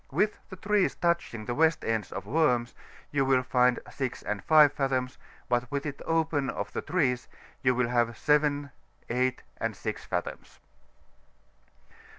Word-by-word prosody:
With 210 0 0
the 190 - -8
trees 205 +1 +1
touching 170 -10 -1
the 120 - -2
west 160 +3 +2
ends 110 -3 -1
of - - -5
Worms, 125 -2 +1 0.4
you 145 -1 +2
will 130 -1 +3
find 125 -1 +3
6 130 -3 -4
and 100 -2 -3
5 150 -2 +6
fathoms, 130 -2 -1 0.3
but 120 0 0
with 140 0 -3
it 145 -2 -5
open 160 -4 +1
of - - -4
the - - -2
trees 135 -7 0 0.3
you 125 -2 +3
will 125 -1 +1
have 120 -2 +1
7, 145 -2 +2 0.4
8, 130 +1 0
and - - -2
6 - - -5
fathoms. - - -5
135 Hz, 155 wpm, -28 LUFS, 125-150 Hz, 0.4 s, 5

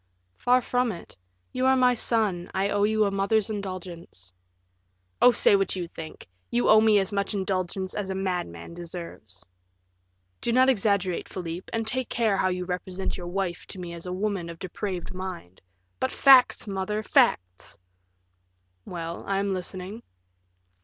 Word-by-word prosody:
"Far 250 +1 +3
from 245 0 0
it; 175 - -10 0.4
you 255 +1 +1
are 265 - +5
my 250 -1 +5
son, 215 -7 0
I 195 +1 +1
owe 205 0 +2
you 215 0 +2
a 200 - 0
mother's 200 +2 +1
indulgence." 180 - -7 0.9
"Oh, 245 - +9
say 235 - +5
what 195 0 +1
you 180 -2 -3
think; 160 -1 -9 0.2
you 120 +4 +1
owe 215 0 +8
me 220 -1 +5
as 195 0 +1
much 200 +1 -1
indulgence 190 -1 -2
as 205 -2 -3
a 190 - -2
madman 175 - -3
deserves." 170 - -7 1.0
"Do 235 - 0
not 260 +2 +5
exaggerate, 200 -6 +1
Philip, 175 -1 -6
and 225 -1 -1
take 255 +2 -2
care 225 -4 +1
how 190 - +2
you 180 0 -2
represent 185 +1 -3
your 175 -2 -6
wife 180 -1 -3
to 190 - -8
me 175 -1 -6
as 170 +1 -7
a - - -3
woman 190 -2 -2
of 170 - -8
depraved 185 0 -5
mind 185 - -7 0.2
" 90 0 -45
"But 130 - 0
facts, 265 -2 +6
mother, 205 +1 -2
facts!" 90 - +1 1.1
"Well, 170 -1 -5
I 195 - 0
am 200 0 0
listening." 185 +4 -5
190 Hz, 165 wpm, -26 LUFS, 175-215 Hz, 1.1 s, Oh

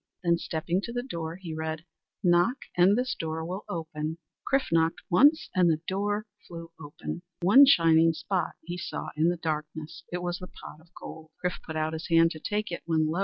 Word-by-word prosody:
Then 170 -1 +2
stepping 170 +4 -1
to 235 - -5
the 245 0 -3
door, 165 -9 -5
he 175 -3 -7
read: 160 +1 -4 0.4
"Knock 175 +8 +4 0.2
and 185 +4 +5
this 250 +1 0
door 160 0 -4
will 185 +4 -5
open." 160 -1 -4 0.3
Chrif 275 0 +2
knocked 165 0 +2
once, 290 - +5
and 180 -2 +4
the 160 -1 +2
door 205 +2 -1 0.2
flew 165 -1 -9
open. 145 +3 -7 0.2
One 260 +10 +8
shining 165 -7 +5
spot 185 +3 -2
he 175 +2 -6
saw 175 - -5
in 160 +2 +3
the 175 - -1
darkness. 155 -1 -4
It 180 0 -3
was 175 0 -2
the 180 - -8
pot 155 - -12
of 165 - -23
gold. 160 0 -10 0.2
Chrif 180 - -1
put 160 - -7
out 155 0 -1
his 160 +1 -5
hand 165 0 +5
to 155 - -7
take 210 +3 -2
it, 170 - -4
when 155 -2 +2
lo! 170 - -1
170 Hz, 205 wpm, -28 LUFS, 160-185 Hz, 0.4 s, One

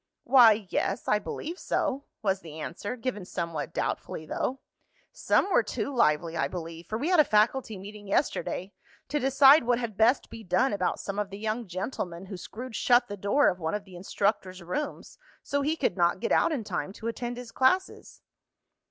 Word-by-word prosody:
"Why, 225 -5 +6
yes, - - -1
I 210 - +3
believe 330 - -6
so," 275 +2 -1 0.2
was 195 -2 +1
the 160 -3 -10
answer, 200 +9 -5
given 235 -5 -4
somewhat 170 -4 -4
doubtfully 155 - -3
though. 260 - -3 0.5
"Some 395 - +1
were - - +5
too 280 - -4
lively, 165 - +2
I 160 - +1
believe, 165 -1 -7
for 215 - -2
we 290 +9 -1
had 360 -3 +4
a - - +9
faculty 220 -1 +1
meeting 205 +2 -10
yesterday 195 - -1 0.4
to 295 - 0
decide 270 +2 +6
what 245 0 +3
had 235 -4 -4
best 230 +5 +3
be 225 - -9
done 235 +5 +2
about 185 -3 -1
some 200 +1 -4
of 205 -1 -2
the 200 - -8
young 220 +2 -3
gentlemen 180 -1 -4
who 190 0 -7
screwed 225 +7 -8
shut 245 +2 +3
the 205 - -4
door 205 +9 +2
of 180 - +1
one 160 +3 -2
of 210 - -4
the 185 -2 -13
instructor's 190 0 -2
rooms 290 - -5 0.2
so 285 - -1
he 300 +3 0
could 260 - 0
not 175 0 +2
get - - -2
out - - +4
in 275 -7 -2
time 190 -1 -4
to 225 - -7
attend 240 +1 -4
his 245 -2 -8
classes." 365 +9 0
210 Hz, 195 wpm, -28 LUFS, 185-255 Hz, 0.5 s, a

